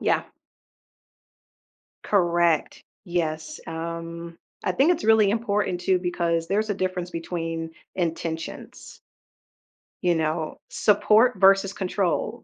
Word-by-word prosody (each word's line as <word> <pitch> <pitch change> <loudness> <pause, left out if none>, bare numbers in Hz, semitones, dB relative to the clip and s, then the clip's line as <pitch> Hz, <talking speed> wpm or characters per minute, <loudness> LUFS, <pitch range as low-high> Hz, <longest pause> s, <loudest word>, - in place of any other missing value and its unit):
Yeah. - - +1 1.8
Correct. 175 -4 +1 0.2
Yes. 155 -3 -2
Um, 165 +1 -6 0.3
I - - +1
think 275 - +4
it's 345 -1 -1
really 220 -2 +5
important, 205 -5 0
too, 185 +1 +2
because 170 -2 -1
there's 215 +3 0
a - - +2
difference 185 -2 -2
between 165 -1 -4 0.2
intentions, 165 - -5 1.0
You 175 -1 +2
know, 160 0 -2
support 215 +4 +4
versus 195 0 +5
control. 190 -3 -1
175 Hz, 100 wpm, -25 LUFS, 165-195 Hz, 1.8 s, really